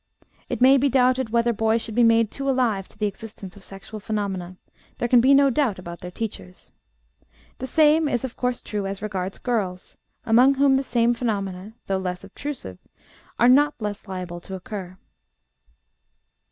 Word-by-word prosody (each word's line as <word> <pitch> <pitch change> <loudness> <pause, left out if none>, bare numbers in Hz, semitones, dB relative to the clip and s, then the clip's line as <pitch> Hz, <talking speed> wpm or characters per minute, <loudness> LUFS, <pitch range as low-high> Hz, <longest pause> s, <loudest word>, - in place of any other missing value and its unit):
It - - -3
may 265 +2 +7
be 275 +1 +2
doubted 255 -1 +2
whether 235 +1 +2
boys 220 +1 +1
should 225 -1 -4
be 240 - +2
made 230 -2 +4
too 275 0 -3
alive 235 -7 +1
to - - -18
the 210 - -1
existence 205 -2 -7
of 200 - -15
sexual 195 +3 -10
phenomena; 195 -4 -4 0.4
there 240 - -1
can 240 0 +5
be 260 +3 +4
no 275 0 +6
doubt 245 -6 +1
about 170 -1 -8
their 180 - -7
teachers. 180 - -7 0.9
The 260 - -4
same 305 +2 +4
is, 245 -2 -1
of 260 -2 -5
course, 250 -1 -2
true 205 -2 -3
as 195 +1 -6
regards 195 -2 -3
girls, 195 -7 -3 0.3
among 250 +5 +5
whom 275 0 +4
the 265 - +2
same 240 -2 +2
phenomena, 205 -4 -3
though 195 -1 -1
less 180 -1 -4
obtrusive, 265 - -7 0.6
are 240 - +4
not 290 +3 +4
less 210 -1 -5
liable 180 -2 -6
to 190 +2 -8
occur. 185 -1 -7
225 Hz, 175 wpm, -23 LUFS, 195-255 Hz, 0.9 s, may